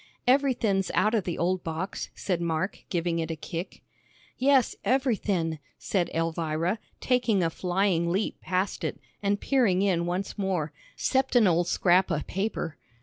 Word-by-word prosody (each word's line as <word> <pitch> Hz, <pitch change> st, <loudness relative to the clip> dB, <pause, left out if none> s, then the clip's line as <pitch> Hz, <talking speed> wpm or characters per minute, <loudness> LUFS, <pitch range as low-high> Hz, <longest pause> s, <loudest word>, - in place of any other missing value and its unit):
"Everythin's 245 Hz, -7 st, +2 dB
out 215 Hz, +4 st, +3 dB
of 215 Hz, -5 st, +1 dB
the 175 Hz, -, -2 dB
old 180 Hz, +1 st, 0 dB
box," 165 Hz, +4 st, -4 dB
said 180 Hz, -3 st, -2 dB
Mark, 170 Hz, +3 st, -2 dB
giving 170 Hz, -2 st, 0 dB
it 160 Hz, 0 st, -2 dB
a 165 Hz, -, -2 dB
kick. 170 Hz, +3 st, -6 dB, 0.5 s
"Yes, 265 Hz, -1 st, +3 dB
everythin'," 205 Hz, -, +1 dB, 0.2 s
said 180 Hz, -4 st, -1 dB
Elvira, 165 Hz, +3 st, 0 dB, 0.2 s
taking 235 Hz, -7 st, +2 dB
a 165 Hz, -, +1 dB
flying 180 Hz, -1 st, +1 dB
leap 195 Hz, +4 st, -1 dB
past 185 Hz, +2 st, -1 dB
it, -, -, -3 dB, 0.2 s
and 200 Hz, 0 st, +1 dB
peering 210 Hz, -9 st, +2 dB
in 175 Hz, -4 st, +1 dB
once 185 Hz, +4 st, -3 dB
more, 180 Hz, -6 st, -1 dB, 0.2 s
"'cept 265 Hz, -1 st, +1 dB
an 235 Hz, -3 st, +6 dB
old 175 Hz, -1 st, +3 dB
scrap 185 Hz, +2 st, +3 dB
o' 160 Hz, -4 st, 0 dB
paper." 195 Hz, -5 st, -3 dB
185 Hz, 150 wpm, -27 LUFS, 170-210 Hz, 0.5 s, an